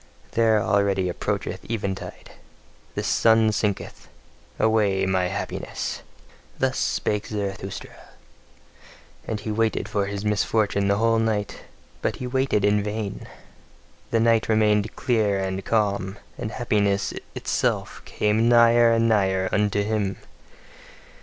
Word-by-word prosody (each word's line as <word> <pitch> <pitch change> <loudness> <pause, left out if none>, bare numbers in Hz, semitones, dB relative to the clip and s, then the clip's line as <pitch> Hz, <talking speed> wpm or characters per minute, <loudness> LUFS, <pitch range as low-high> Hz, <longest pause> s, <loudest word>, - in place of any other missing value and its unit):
There, 115 -2 +3
already 100 -2 +1
approacheth 90 - -3
eventide: 100 -4 -5 0.6
the - - -2
sun 110 -1 +4
sinketh. 100 -1 -3 0.5
Away 105 -4 +2
my 95 -1 +1
happiness! 95 - -4 0.6
Thus - - 0
spake 105 0 -1
Zarathustra. 100 -2 -5 1.2
And 105 -2 -3
he 110 - -4
waited 110 +1 0
for 100 -1 -1
his 100 +1 -4
misfortune 105 -1 +1
the 100 0 +2
whole 115 +1 +3
night; 110 -2 -2 0.4
but - - -1
he 125 - -6
waited 130 -5 +1
in 105 0 +3
vain. 105 0 -4 0.8
The 115 - +1
night 115 -1 +3
remained 105 -1 +2
clear 110 -6 +1
and 95 0 -3
calm, 100 -3 0 0.2
and - - -4
happiness 105 -4 0 0.2
itself - - -1
came 110 +2 +1
nigher 120 0 +6
and 115 0 +3
nigher 95 -4 +2
unto 105 0 +1
him. 105 -2 -1
105 Hz, 120 wpm, -24 LUFS, 100-110 Hz, 1.2 s, nigher